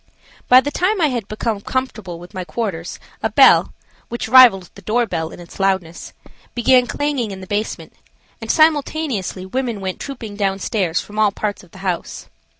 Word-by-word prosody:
By 255 +1 +8
the 290 - -4
time 375 +6 0
I 310 -3 +3
had 240 -6 -3
become 215 0 -3
familiar 215 -9 -4
with 175 +4 -13
my 185 -2 -4
quarters 180 -5 -4 0.2
a - - 0
bell, - - +5 0.4
which 235 -1 -4
rivaled 225 -7 +6
the 200 - -14
door 235 +4 +1
bell 160 -6 -3
in - - -12
its 175 +2 -13
loudness, 190 -4 -1 0.4
began 250 +1 +4
clanging 290 -6 -2
in 195 -1 -7
the 185 - -9
basement, 205 +3 -4 0.5
and 225 - -8
simultaneously 295 - +1
women 235 +1 -3
went 190 -1 -4
trooping 230 -7 -7
down 195 -2 0
stairs 190 -4 -1
from 210 +1 -8
all 210 -2 +4
parts 205 0 -4
of 180 - -18
the 185 - -15
house. 180 -2 -4
215 Hz, 180 wpm, -19 LUFS, 190-255 Hz, 0.5 s, By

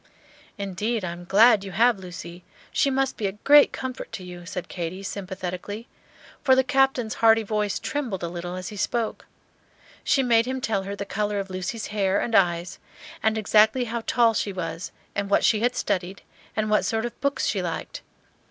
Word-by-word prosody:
"Indeed, 200 +2 -2
I 170 - -3
am 175 +1 -9
glad 210 +2 +6
you 195 -2 -7
have 235 +1 +3
Lucy; 175 -1 -9 0.3
she 280 - +2
must 270 0 0
be 210 - -1
a 190 - -3
great 285 +8 +6
comfort 260 -1 -6
to 185 - -6
you," 175 -1 -9
said 180 - -5
Katy, 180 +2 -5
sympathetically; 195 +3 -5 0.6
for 260 - +5
the 260 - +4
Captain's 265 -3 +2
hearty 225 0 +6
voice 210 -1 -1
trembled 240 -11 -3
a - - -1
little 175 +1 -5
as 185 -1 -5
he 210 - -9
spoke. 230 +3 -2 0.8
She 270 - +3
made 230 -1 +3
him 260 0 -2
tell 220 -5 0
her 200 +1 -4
the 200 - -5
color 205 +1 -2
of 195 -1 -5
Lucy's 185 +5 -4
hair 200 -1 +2
and 235 - -2
eyes, 175 -2 +2 0.4
and 220 0 +2
exactly 215 +3 +4
how 235 0 -3
tall 235 -2 +4
she 210 - -1
was, 170 -1 -5 0.2
and 200 0 -2
what 200 - +3
she 215 - +4
had 245 +3 +1
studied, 190 -1 -2 0.3
and 215 -1 -1
what 210 - +4
sort 225 0 -1
of 240 - -7
books 280 +1 0
she - - 0
liked. - - -5
210 Hz, 190 wpm, -25 LUFS, 185-235 Hz, 0.8 s, glad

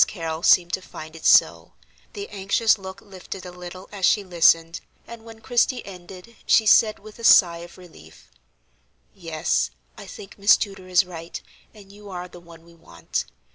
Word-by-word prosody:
Carrol 165 -4 -5
seemed 175 0 +4
to 190 - -1
find 155 -3 -11
it 165 - -11
so; 80 0 +3 0.4
the 200 0 -7
anxious 205 +2 +1
look 190 0 -10
lifted 190 -1 -10
a 180 - -8
little 180 +1 -11
as 200 -2 -9
she 205 +2 +3
listened, 165 -2 +2 0.3
and 230 -1 -12
when 225 -1 -14
Christie 245 +1 0
ended 185 +3 -12
she 220 - +4
said, 215 0 +4
with 215 +2 -15
a - - -11
sigh 170 -6 +5
of 170 0 -12
relief: 160 - -17 0.8
"Yes, 155 - -2 0.3
I - - -11
think 200 +1 -12
Miss 200 +2 +5
Tudor 195 -3 -6
is 180 0 +3
right, 170 -2 -9 0.3
and 200 -3 -17
you 205 0 -14
are 180 -1 -7
the 175 - -14
one 170 -1 -17
we 170 - -19
want. 170 +1 -6
185 Hz, 175 wpm, -23 LUFS, 170-205 Hz, 0.8 s, sigh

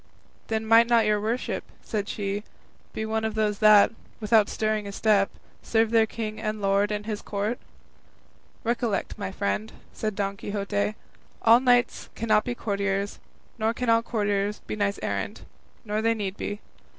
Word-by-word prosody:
"Then 220 0 -1
might 225 +1 +6
not 235 -2 +4
your 210 -1 +2
worship," 230 +4 -2 0.2
said 205 -2 -3
she, 200 0 -3 0.5
"be 220 - -3
one 220 0 -1
of 220 -1 -2
those 210 -2 0
that, 215 -1 +7 0.3
without 215 -1 +4
stirring 215 -1 -1
a - - -5
step, 200 -1 +3 0.3
serve 225 -1 +1
their 225 -1 +4
king 215 -1 -5
and 215 0 -2
lord 200 +1 +2
in 210 0 -2
his 210 -1 -4
court?" 210 +4 -2 1.0
"Recollect, 235 -3 -1
my 95 - -3
friend," 100 +3 -2 0.2
said 215 -2 -3
Don 200 -1 -2
Quixote, 205 0 -2 0.5
"all 230 +1 +7
knights 245 -1 +2
cannot 215 -1 +2
be 245 - -2
courtiers, 200 -2 -2 0.4
nor 220 +1 +1
can 250 -1 +1
all 230 0 +5
courtiers 205 -2 -1
be - - -4
knights 200 -1 0
errant, - - -3 0.4
nor 210 0 -1
need 215 -4 0
they - - -3
be. 205 - -19
215 Hz, 165 wpm, -26 LUFS, 205-225 Hz, 1.0 s, that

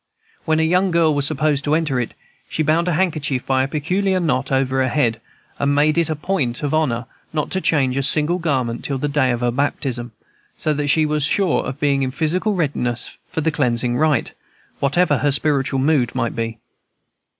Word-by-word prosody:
When 160 -1 +2
a - - +3
young 180 +4 +2
girl 165 -3 +3
was 145 -1 +1
supposed 150 -2 0
to 150 +1 +2
enter 155 -6 0
it, 120 - -4 0.3
she 155 - -1
bound 160 +3 +2
a 180 - +1
handkerchief 155 -7 -1
by 130 -1 +2
a 135 - 0
peculiar 185 +7 0
knot 140 -6 -1
over 135 0 +1
her 130 - +2
head, 120 -6 0 0.4
and 140 0 +1
made 150 +1 +3
it 170 -2 +2
a 155 - -1
point 150 -6 -2
of 145 - -1
honor 125 -7 0 0.3
not 150 -2 -2
to 190 - -1
change 135 -7 +2
a - - +2
single 150 +5 +2
garment 130 -8 -1
till 140 - -2
the 145 - -2
day 140 -3 +1
of 120 -1 -1
her 120 0 +1
baptism, 125 -2 -2 0.4
so 155 - 0
that 145 0 -2
she 155 +2 +3
was 150 -1 0
sure 185 +3 +2
of 135 +2 -5
being 140 -2 +1
in 130 - 0
physical 170 +9 -1
readiness 130 -8 -1
for 160 - -3
the 160 +1 +1
cleansing 120 -4 0
rite, 150 -2 +1 0.5
whatever 145 +1 +2
her 145 - +2
spiritual 140 -1 +1
mood 135 -2 +1
might 115 - -1
be. 115 0 -3
145 Hz, 205 wpm, -20 LUFS, 130-160 Hz, 0.5 s, a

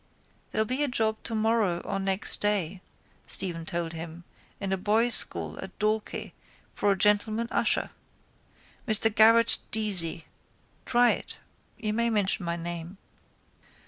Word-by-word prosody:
—There'll 220 - 0
be 255 +6 -3
a 290 - +1
job 220 -4 -1
tomorrow 220 -5 -1
or 195 - -4
next 195 0 -1
day, 200 -3 -1 0.5
Stephen 170 -3 -4
told 170 -2 -4
him, 165 +1 -9 0.4
in 195 -1 -3
a - - +2
boys' 220 +5 +2
school 80 - +2
at 190 - -10
Dalkey 215 +1 -3 0.4
for 205 - 0
a 195 - 0
gentleman 215 +3 +1
usher. - - 0 1.0
Mr 220 0 +3
Garrett 230 +2 +5
Deasy. 190 -6 +6 0.6
Try 245 0 +3
it. - - -6 0.4
You 215 -2 -3
may 235 +1 0
mention 205 -4 0
my 170 - -2
name. 170 +2 -7
205 Hz, 135 wpm, -26 LUFS, 175-220 Hz, 1.0 s, Deasy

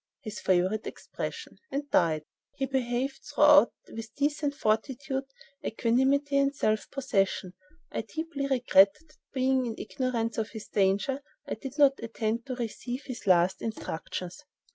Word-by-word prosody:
(his 215 -5 -6
favorite 190 +4 +1
expression) - - -6
and 285 +1 -3
died. 155 -2 +3 0.3
He 270 - -1
behaved 265 0 -1
throughout 295 -3 +6 0.2
with 225 0 -8
decent 290 0 0
fortitude, 265 +4 -1 0.4
equanimity 270 +5 +2
and 275 +1 +2
self 215 -5 0
possession. 195 -8 0 0.4
I - - -1
deeply 280 +6 -4
regret 235 -7 +5
that, 310 0 -24
being 260 -1 +2
in 225 - -3
ignorance 240 -4 -2
of 220 - -1
his 220 -2 -8
danger, 200 +8 +1 0.2
I - - -3
did 270 +1 -7
not 280 -2 +5
attend 230 +1 -2
to 255 - -3
receive 245 +2 -4
his 245 -5 -7
last 180 0 +4
instructions. 185 - -5
250 Hz, 140 wpm, -29 LUFS, 215-275 Hz, 0.4 s, throughout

